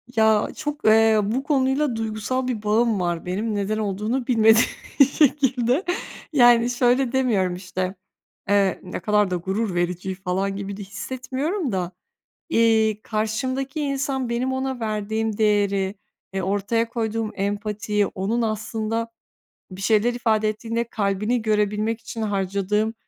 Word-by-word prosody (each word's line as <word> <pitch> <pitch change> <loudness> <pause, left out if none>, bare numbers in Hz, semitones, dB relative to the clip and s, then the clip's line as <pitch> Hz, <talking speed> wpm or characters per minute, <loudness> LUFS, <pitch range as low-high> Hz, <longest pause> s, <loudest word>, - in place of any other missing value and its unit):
Ya, 220 -1 +4
çok, 295 -1 -5
eee, 220 0 +5
bu 235 +7 -1
konuyla 270 -2 +1
duygusal 225 +4 -2
bir 230 -4 -3
bağım 220 0 +2
var 175 -2 -2
benim 210 +5 -2
neden 205 +1 -1
olduğunu 215 +5 -2
bilmediğim 225 -2 +5 0.3
bir 280 - +9
şekilde. 270 0 +2 0.5
Yani 240 -3 +6
şöyle 245 +1 +2
demiyorum, 215 -9 +1
işte, 185 +1 -4 0.5
eee, 200 -2 +3
"ne 180 - -5
kadar 210 -2 +2
da 180 - +1
gurur 190 +3 -2
verici" 180 +2 -1
falan 190 +1 -2
gibi 200 0 -5
de - - -7
hissetmiyorum 260 - -3
da, 185 -2 -2 0.6
iii, 220 -4 +3
karşımdaki 255 +7 -2
insan 270 -3 -1
benim 250 +2 -1
ona 265 -1 -2
verdiğim 220 0 -2
değeri, 200 -2 +1 0.4
eee, 195 - -1
ortaya 205 +5 0
koyduğum 225 -2 -2
empatiyi, 205 +1 -1
onun 215 +5 -2
aslında 220 +1 -2 0.6
bir 185 +1 -8
şeyler 220 +3 +3
ifade 220 -3 +1
ettiğinde 230 +2 -2
kalbini 215 +1 -1
görebilmek 215 +1 0
için 230 0 -6
harcadığım, 200 +1 0
220 Hz, 135 wpm, -23 LUFS, 200-240 Hz, 0.6 s, bir